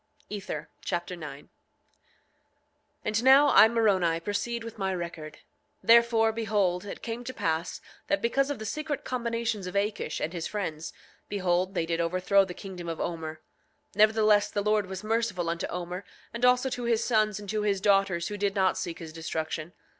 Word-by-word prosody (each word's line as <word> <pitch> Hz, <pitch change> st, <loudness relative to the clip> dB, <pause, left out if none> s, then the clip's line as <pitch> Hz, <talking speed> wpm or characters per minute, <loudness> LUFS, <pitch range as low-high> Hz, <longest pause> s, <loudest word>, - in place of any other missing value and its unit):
Ether 195 Hz, -7 st, -5 dB, 0.2 s
Chapter 175 Hz, +1 st, -3 dB
9 150 Hz, -4 st, -8 dB
9:1 -, -, -27 dB, 1.6 s
And 215 Hz, +2 st, 0 dB
now 275 Hz, +2 st, +7 dB
I, 220 Hz, -, +8 dB
Moroni, 195 Hz, -8 st, +2 dB
proceed 225 Hz, +6 st, -3 dB
with 230 Hz, -1 st, -9 dB
my 190 Hz, -1 st, 0 dB
record. 170 Hz, -3 st, -6 dB, 0.5 s
Therefore, 230 Hz, -1 st, +5 dB
behold, 205 Hz, -5 st, 0 dB
it 200 Hz, -, -8 dB
came 235 Hz, +1 st, -4 dB
to 255 Hz, +1 st, -6 dB
pass 160 Hz, +2 st, -2 dB, 0.3 s
that 200 Hz, -, +1 dB
because 270 Hz, +6 st, +1 dB
of 285 Hz, -, -2 dB
the 220 Hz, -, -7 dB
secret 305 Hz, +4 st, -3 dB
combinations 230 Hz, -5 st, -2 dB
of 180 Hz, -, -7 dB
Akish 200 Hz, -5 st, -1 dB
and 165 Hz, -, -3 dB
his 170 Hz, -2 st, -3 dB
friends, 165 Hz, -7 st, -4 dB, 0.4 s
behold, 185 Hz, -1 st, 0 dB
they 165 Hz, -, +1 dB
did 165 Hz, 0 st, -1 dB
overthrow 185 Hz, +3 st, +3 dB
the 180 Hz, -2 st, -8 dB
kingdom 180 Hz, -4 st, -7 dB
of 165 Hz, -, -4 dB
Omer. 160 Hz, -2 st, -4 dB, 0.5 s
9:2 -, -, -25 dB
Nevertheless, 215 Hz, -1 st, +4 dB
the 205 Hz, -, -2 dB
Lord 210 Hz, -1 st, +2 dB
was 190 Hz, +1 st, -6 dB
merciful 220 Hz, -5 st, 0 dB
unto 170 Hz, 0 st, -2 dB
Omer, 180 Hz, +2 st, -5 dB, 0.3 s
and 235 Hz, +1 st, 0 dB
also 250 Hz, +1 st, +4 dB
to 245 Hz, -1 st, -3 dB
his 230 Hz, -1 st, +2 dB
sons 215 Hz, -3 st, +2 dB
and 205 Hz, -, -9 dB
to 215 Hz, -1 st, 0 dB
his 200 Hz, -2 st, +1 dB
daughters 195 Hz, -4 st, +2 dB
who 205 Hz, -, -4 dB
did 200 Hz, 0 st, 0 dB
not 190 Hz, -1 st, +2 dB
seek 170 Hz, -1 st, -4 dB
his 160 Hz, -2 st, -9 dB
destruction. 160 Hz, 0 st, -4 dB
200 Hz, 180 wpm, -28 LUFS, 175-225 Hz, 1.6 s, I